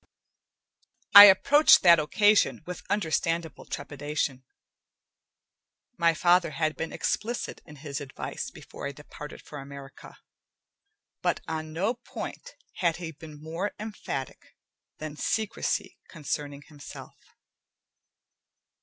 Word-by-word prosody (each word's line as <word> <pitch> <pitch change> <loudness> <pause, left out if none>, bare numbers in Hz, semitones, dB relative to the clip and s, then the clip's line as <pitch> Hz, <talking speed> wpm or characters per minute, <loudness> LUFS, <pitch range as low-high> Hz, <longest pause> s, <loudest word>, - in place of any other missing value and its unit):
I 205 0 +14
approached 295 +11 +6
that 170 -2 +7
occasion 205 +5 +2
with 180 -1 -7
understandable 165 -4 -1
trepidation. 145 -2 -4 1.5
My 170 -1 +2
father 175 +1 +3
had 155 +1 -1
been 160 - -5
explicit 235 +3 -3
in 150 - -12
his 145 -1 -6
advice 135 -1 -6
before - - -9
I 140 - -6
departed 150 +1 -11
for 145 - -9
America, 140 0 -11 1.0
but - - 0
on 155 -1 -4
no 190 +9 0
point 255 - -9 0.2
had 170 -3 +1
he 170 -2 -6
been 155 -1 -13
more 170 +6 -4
emphatic 205 - -7 0.4
than 150 -1 -7
secrecy 220 +4 -2
concerning 145 -2 -5
himself. 145 -2 -12
160 Hz, 105 wpm, -27 LUFS, 150-190 Hz, 1.5 s, I